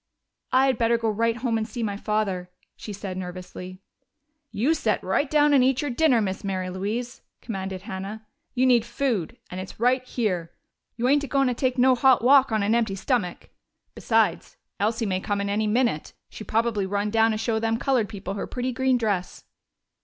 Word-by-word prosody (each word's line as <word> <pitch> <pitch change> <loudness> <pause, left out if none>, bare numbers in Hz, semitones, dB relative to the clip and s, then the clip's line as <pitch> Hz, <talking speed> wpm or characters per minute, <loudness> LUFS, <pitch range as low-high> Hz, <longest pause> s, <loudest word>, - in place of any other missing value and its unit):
"I 260 +1 +5
had 260 -4 +1
better 235 0 +3
go 225 -1 0
right 230 +2 0
home 235 -2 0
and 220 - -3
see 235 +1 -5
my 205 -2 -2
father," 200 -4 -2 0.3
she 215 - -8
said 195 -2 -6
nervously. 185 +1 -8 0.7
"You 235 +8 +1
set 235 -9 0
right 230 +10 0
down 295 -1 +4
and 270 -3 +5
eat 265 +2 +2
your 290 - -2
dinner, 255 -3 +3
Miss 195 0 -3
Mary 185 -2 -3
Louise!" 220 +7 -4 0.2
commanded 190 -4 -5
Hannah. 210 +1 -6 0.3
"You 255 +1 +3
need 245 -3 +5
food 235 - -2
and 180 - -5
it's 185 - -10
right 250 +2 +2
here. 195 -10 -2 0.4
You 240 +2 0
ain't 285 +2 +3
a - - -4
goin' 275 0 +2
to - - 0
take 255 +1 -1
no 255 +1 +5
hot 255 -1 +4
walk 270 0 +6
on 215 -2 +1
an 210 +2 +2
empty 225 -4 +1
stomach! 205 -4 -2 0.4
Besides, - - 0 0.2
Elsie 220 +3 0
may 185 -2 0
come 205 +1 -2
in 200 0 -2
any 215 +2 0
minute. 225 -8 0 0.2
She - - -8
probably 220 -3 0
run 205 +1 -1
down 225 0 +4
to 215 - 0
show 225 0 0
them 225 0 0
colored 245 -4 +1
people 195 -3 -6
her 200 - -4
pretty 250 +1 -3
green 260 0 +2
dress." 205 -6 -2
225 Hz, 200 wpm, -25 LUFS, 200-250 Hz, 0.7 s, walk